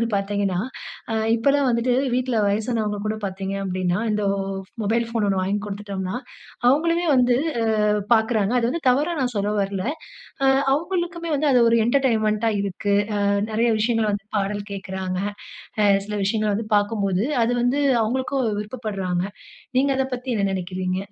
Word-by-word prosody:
வந்து 230 - +2
பார்த்தீங்கன்னா, 200 -2 0 0.5
அ - - 0 0.2
இப்பல்லாம் 280 +4 +2
வந்துட்டு 235 +2 +1 0.2
வீட்ல 255 -1 0
வயசானவங்க 215 0 0
கூட 215 - 0
பார்த்தீங்க 195 0 -3
அப்பிடின்னா, 185 -1 -1
இந்த 210 0 0 0.6
மொபைல் 230 +3 +1
ஃபோன் 225 -3 0
ஒண்ணு 195 -1 +1
வாங்கிக் 200 +2 -1
குடுத்துட்டம்னா, 200 0 -4 0.5
அவுங்களுமே 335 +6 +2
வந்து 245 -1 +4 0.5
அ - - +3 0.3
பார்க்கிறாங்க. 220 -2 +2
அது 230 - +1
வந்து 335 +5 -3
தவறா 290 +7 +2
நான் 245 -2 -1
சொல்ல 205 +1 0
வரல. 195 -1 -2 0.6
அ - - +5 0.3
அவுங்களுக்குமே 340 +1 -2
வந்து 295 +1 +1
அது 245 - +5
ஒரு 230 - +4
என்டர்டெயின்மெண்ட்டா 225 -4 +2
இருக்கு. 200 +1 -2 0.3
அ - - +3 0.2
நிறைய 230 +2 +2
விஷயங்கள் 225 -1 +1
வந்து 200 +1 -4
பாடல் 205 +1 -2
கேட்குறாங்க. 190 -1 -4 0.6
அ 210 - +4 0.2
சில 210 - -4
விஷயங்கள 215 +1 +1
வந்து 220 +2 -3
பார்க்கும்போது, 205 -1 +1 0.2
அது 240 - +1
வந்து 255 +4 +2 0.2
அவுங்களுக்கும் 260 +3 0
விருப்பப்பட்றாங்க. 200 -6 -3 0.5
நீங்க 275 +2 +3
அத 265 - +1
பத்தி 250 +1 -8
என்ன 200 -1 +1
நினைக்கிறீங்க? 185 0 -2
215 Hz, 150 wpm, -23 LUFS, 200-250 Hz, 0.6 s, அ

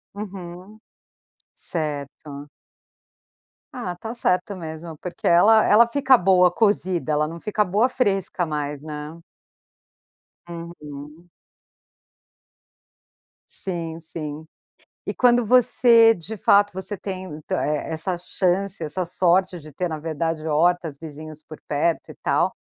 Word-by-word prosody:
Uhum. 190 0 -9 0.8
Certo. 145 -2 -5 1.3
Ah, 190 -8 -5
tá 225 +6 -7
certo 195 -2 0
mesmo 160 -1 -8
porque 180 +3 -5
ela 215 +6 +6
ela 230 +3 +6
fica 265 +1 +4
boa 180 -2 +4
cozida, 185 -5 +1
ela 150 0 +1
não 165 +1 -8
fica 210 +3 0
boa 210 +7 +2
fresca 195 -7 0
mais, 150 -2 -4
né. 150 +1 -7 1.3
Uhum. 165 -1 -10 2.2
Sim, 165 -3 -5
sim. 155 -1 -7 0.6
E - - -1
quando 245 -1 +3
você 230 -1 +6
de 215 +3 -8
fato 205 +2 +4
você 190 +2 -5
tem 190 0 -6 0.3
é 150 -1 -1
é - - -3
essa 175 +3 -2
chance, 185 +1 -1
essa 170 +4 -3
sorte 180 +1 +2
de 155 0 -12
ter 180 +5 -2
na 155 -1 -4
verdade 165 0 -3
hortas, 160 0 +1
vizinhos 155 0 -10
por 155 - -12
perto 155 +3 0
e - - -10
tal, - - +1
175 Hz, 120 wpm, -23 LUFS, 155-200 Hz, 2.2 s, ela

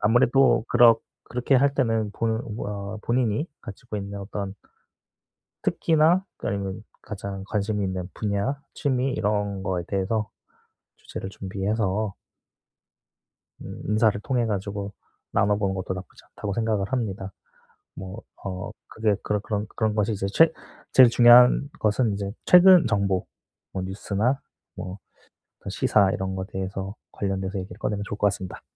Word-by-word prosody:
아무래도 120 +2 +4
그렇 120 -2 +6 0.3
그렇게 125 +3 0
할 140 +1 +3
때는 115 -5 +1
본 115 +1 -1
뭐야 100 -1 -5
본인이 120 +3 0
가지고 105 +2 -8
있는 100 0 -5
어떤 100 -1 -5 1.1
특기나 165 +4 +3
그 - - -5
아니면 100 +1 -3 0.2
가장 100 -2 -6
관심이 105 -1 -1
있는 95 -1 -4
분야, 105 +7 -1
취미 130 -2 0
이런 105 -2 -1
거에 90 -3 -1
대해서 105 +2 -1 0.7
주제를 95 - -7
준비해서 100 +1 -2 1.5
음 - - -8
'인사를 105 -1 +3
통해 125 -2 0
가지고 100 -1 -3 0.4
나눠보는 100 -1 +1
것도 95 0 -3
나쁘지 90 -1 -10
않다.'고 100 -1 -5
생각을 110 -1 -1
합니다. 100 -6 -2 0.6
뭐 95 +4 -8 0.2
어 90 -2 -4 0.2
그게 110 -2 0
그런 105 -1 0
그런 105 -1 -2
그런 110 -2 0
것이 105 +1 +1
이제 100 0 -2
최 165 0 +6 0.4
제일 130 -2 +9
중요한 125 +3 +7
것은 110 +1 +2
이제 100 0 -3 0.2
최근 180 0 +8
정보 100 -3 +1 0.5
뭐 95 - -2
뉴스나 105 +7 -1 0.3
뭐 90 +2 -6 0.7
시사 100 -3 +3
이런 95 0 -3
거 95 0 -3
대해서 95 +1 -5 0.2
관련돼서 95 0 -2
얘기를 95 +1 -8
꺼내면 105 -3 -2
좋을 105 - -5
것 - - +1
같습니다. 95 -2 -4
105 Hz, 295 characters per minute, -25 LUFS, 95-115 Hz, 1.5 s, 제일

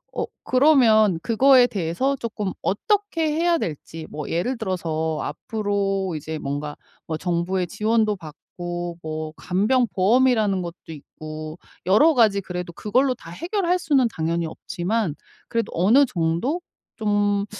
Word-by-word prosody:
어 - - -1 0.2
그러면 230 - +5
그거에 250 +2 +5
대해서 200 +9 -1
쪼끔 215 -5 -4
어떻게 335 - 0
해야 340 +1 +2
될지 160 0 -6
뭐 150 -1 -6
예를 230 +10 -1
들어서 160 -6 -2
앞으로 195 +1 -2
이제 155 +1 -5
뭔가 145 +1 -4 0.3
뭐 160 -1 -2
정부의 175 +1 -1
지원도 215 +2 +1
받고 175 +1 -7
뭐 155 0 -4
간병보험이라는 215 0 +2
것도 170 0 -6
있고 155 +1 -8 0.3
여러 285 - +5
가지 210 -4 +4
그래도 180 -2 -6
그걸로 255 +7 +1
다 165 - -13
해결할 360 - 0
수는 275 -8 +3
당연히 165 -1 -1
없지만 190 +1 -2 0.4
그래도 230 -2 -1
어느 225 +12 +5
정도 195 - -1 0.3
좀 205 -2 +1
200 Hz, 285 characters per minute, -23 LUFS, 170-245 Hz, 0.4 s, 그러면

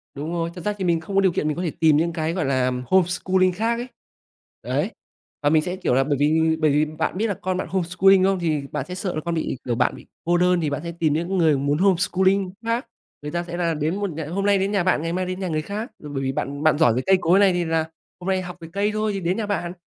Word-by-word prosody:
Đúng 150 +4 -5
rồi, 170 -1 -1
thật 180 - -8
ra 210 - +1
thì 190 - -2
mình 170 -2 +2
không 195 +5 -7
có 195 - +5
điều 190 -2 +3
kiện 155 - -1
mình 150 - -1
có 180 - -2
thể 165 - -1
tìm 155 -2 +5
những 170 +2 0
cái, 160 -1 -1
gọi 175 -4 -1
là, 130 -2 +1 0.2
homeschooling 185 +2 +2
khác 225 +5 0
ấy. 245 - -5 0.8
Đấy. - - -1 0.5
Và 145 - +4
mình 155 0 +4
sẽ, 180 +3 -3
kiểu, 185 - -1
là 135 +2 +4
bởi 145 0 0
vì 160 +2 +3
bởi 155 -2 +3
vì 150 +2 +3
bạn 155 +3 -3
biết 220 +3 +1
là 205 - 0
con 185 0 -1
bạn - - -3
homeschooling 185 +2 +3
không? 195 0 +2
Thì 155 -4 0
bạn 150 - -3
sẽ 180 - -6
sợ 185 -1 -3
là 155 - -2
con 170 0 -1
bị 160 -4 -2
kiểu, 120 - 0
bạn - - +1
bị - - -14 0.2
cô 175 +1 +3
đơn 180 0 +3
thì 155 - 0
bạn 145 +1 -3
sẽ 170 - -4
tìm 155 -3 +2
những 170 +5 -1
người 160 -5 +4
muốn 140 +2 0
homeschooling 190 +1 +2
khác. 230 +2 0 0.4
Người 150 0 -6
ta 175 +1 -2
sẽ 175 0 -6
là 170 -2 0
đến 155 +3 -1
một 200 0 -2
nh 160 - -7
hôm 195 +2 -1
nay 200 -1 +4
đến 195 +1 0
nhà 200 -3 +1
bạn 185 -4 +2
ngày 165 +1 -2
mai 185 +1 -1
đến 185 +1 -4
nhà 190 - -2
người 155 -2 -1
khác, 210 - -5
ờ, 150 - -7
bởi 135 -1 -3
vì 135 - 0
bạn 140 +2 -4
bạn 155 -1 +4
giỏi 155 -7 +4
về 130 - 0
cây 190 0 +5
cối 175 +3 +4
này 195 -2 +5
thì 175 -1 0
là 160 0 0 0.3
hôm 180 - -8
nay 190 -1 +1
học 180 -1 -8
về 165 - -8
cây 205 +1 +1
thôi 215 0 0
thì 195 - -2
đến 180 +1 -1
nhà 225 - -1
bạn, 185 -4 -2
175 Hz, 300 wpm, -23 LUFS, 155-190 Hz, 0.8 s, có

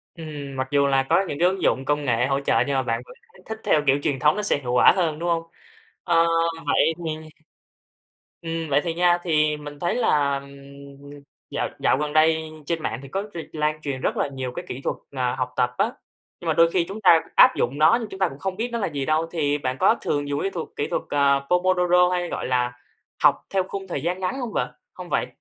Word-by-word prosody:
Ừm, 150 -4 -7
mặc 130 0 -2
dù 140 -1 +3
là 135 -1 +3
có - - +4
những 145 - -4
cái 175 +2 +4
ứng 190 +1 -3
dụng 135 - +1
công 145 +1 0
nghệ 120 -2 +1
hỗ 135 +1 0
trợ 140 - +2
nhưng 140 - -1
mà 135 - +1
bạn 115 -1 -2
vẫn - - -13 0.2
thấy - - -19
thích 220 0 -6
theo 150 - +3
kiểu 135 +1 +4
truyền 145 -3 0
thống 150 +6 +3
nó 210 - -2
sẽ 205 - +1
hiệu 125 -3 -4
quả 125 - +6
hơn, 165 -5 0
đúng 170 +2 -3
hông? 165 -1 +1 0.6
Ơ, 165 -1 +4 0.4
vậy 165 - +3
thì 155 0 -5 1.1
Ừm, 165 -1 -4
vậy 140 +1 +4
thì 165 -2 -2
nha, 175 0 +3
thì 155 -3 +2
mình 145 -1 -9
thấy 175 - 0
là, 145 - +2
ừm, 140 0 -12 1.0
dạo - - -2
dạo - - +2
gần 150 0 -2
đây 160 0 +3 0.2
trên 165 0 -2
mạng 115 - -3
thì 135 - -10
có 195 +8 -2
r - - -9 0.2
lan 155 0 -1
truyền 140 -3 -4
rất - - -1
là - - 0
nhiều 130 -2 -5
cái - - -5
kỹ 125 - -6
thuật, - - -1
ờ, 125 -3 -1
học 125 - -2
tập 125 -1 +2
á. - - +2 0.5
Nhưng - - -5
mà - - +2
đôi 165 0 +5
khi 175 -1 +1
chúng 205 +3 -6
ta 170 -5 +6
áp 255 0 +7
dụng 130 +4 -1
nó 155 +7 +6
nhưng 225 - -5
chúng 190 -1 -10
ta 190 - +3
cũng 135 - -11
không 190 +3 -3
biết 230 +4 -2
nó 235 - -1
là 210 - -1
gì 140 -4 -3
đâu, 155 +1 +1
thì 145 -4 0
bạn 130 -2 -3
có - - +5
thường 145 -1 -2
dùng 145 0 -1
cái 195 - -1
thuật 170 -4 -5
kỹ 145 - -1
thuật, - - -1
à, 140 -1 +3
Pomodoro 180 0 +3
hay, 180 -1 -1
gọi - - -4
là, 125 -1 0 0.5
học - - +7 0.2
theo 195 -1 +1
khung 195 -1 -6
thời 145 -6 -3
gian 180 +3 -2
ngắn 190 +8 -2
hông 240 -4 -4
vợ - - -2 0.2
hông - - -9
vậy? - - 0
155 Hz, 250 wpm, -23 LUFS, 140-175 Hz, 1.1 s, áp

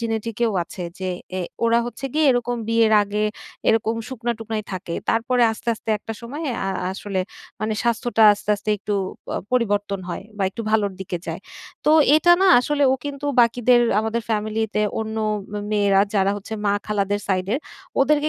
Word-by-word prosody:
genetic 225 -1 -3
এও 220 - -1
আছে 180 - -8 0.2
যে 185 -1 -2 0.3
এ - - -1 0.2
ওরা 230 0 +4
হচ্ছে 240 - -7
গিয়ে 310 0 +3
এরকম 245 0 0
বিয়ের 230 -1 +3
আগে 210 +1 -1 0.4
এরকম 225 0 +2
শুকনা-টুকনাই 225 -3 -3
থাকে। 180 -2 -4
তারপরে 245 +2 +2
আস্তে, 225 - -8
আস্তে 220 - -15
একটা 225 - -7
সময়ে 280 +6 -5 0.2
আ - - -1 0.2
আসলে 195 -1 -3 0.4
মানে 215 0 -1
স্বাস্থ্যটা 235 -1 +1
আস্তে, 205 0 -4
আস্তে 210 +1 -3
একটু 205 +1 -3 0.4
আ - - -1 0.2
পরিবর্তন 205 -5 0
হয় 175 - -5
বা 200 - -2
একটু 230 +4 -6
ভালোর 210 -3 +2
দিকে 190 -1 -3
যায়। - - -4 0.4
তো - - +4 0.3
এটা 345 +3 +5
না 385 - +5
আসলে 290 +3 0
ও - - +3
কিন্তু 285 0 -4
বাকিদের, 240 +1 +4 0.2
আমাদের 220 +1 -2
family 215 +1 0
তে 210 - +2 0.2
অন্য 220 0 -4 0.4
মে 210 - -3
মেয়েরা 200 -2 +4
যারা 195 -1 +3
হচ্ছে 205 +2 -6
মা 200 - +3
খালাদের 205 -1 0
side 185 -1 0
এর। - - +1 0.4
ওদেরকে 295 +2 +3
220 Hz, 175 wpm, -22 LUFS, 205-240 Hz, 0.4 s, এটা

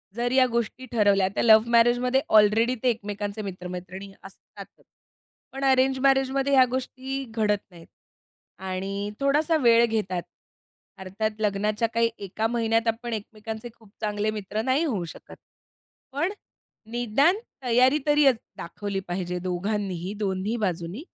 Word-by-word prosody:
जर 240 +1 -1
या 260 0 +5
गोष्टी 235 +2 -2
ठरवल्या, 200 -4 +3
तर - - +1
लव्ह 220 0 +6
मॅरेजमध्ये 245 +3 +3 0.2
ऑलरेडी 220 +4 +4
ते 250 - +4
एकमेकांचे 205 -1 -4
मित्र-मैत्रिणी 185 0 -7
असतातच. 195 0 -14 0.7
पण 270 +1 -6
अरेंज 265 0 +3
मॅरेजमध्ये 270 +1 +2
ह्या 260 -1 +7
गोष्टी 260 +1 -4
घडत 210 -2 +2
नाहीत 170 -1 -15 0.7
आणि 195 +2 -4
थोडासा 300 +4 +2
वेळ 235 -3 +5
घेतात. 205 -6 -2 0.8
अर्थात 215 +3 -3
लग्नाच्या 210 +2 0
काही 230 0 +2
एका 215 +4 -2
महिन्यात 225 -1 0
आपण 230 +1 -2
एकमेकांचे 220 +2 -6
खूप 220 -3 -21
चांगले 210 0 -1
मित्र 210 0 -4
नाही 260 +7 +1
होऊ 210 - -1
शकत. - - -12 0.8
पण 310 +8 -1 0.6
निदान 245 - +2 0.3
तयारी 255 +4 +4
तरी 295 0 +4
अज 265 -3 +6 0.2
दाखवली 195 +3 -5
पाहिजे 180 0 -3
दोघांनीही, 185 0 -3
दोन्ही 200 +2 -2
बाजूंनी, 185 - -3
220 Hz, 130 wpm, -25 LUFS, 200-255 Hz, 0.8 s, ह्या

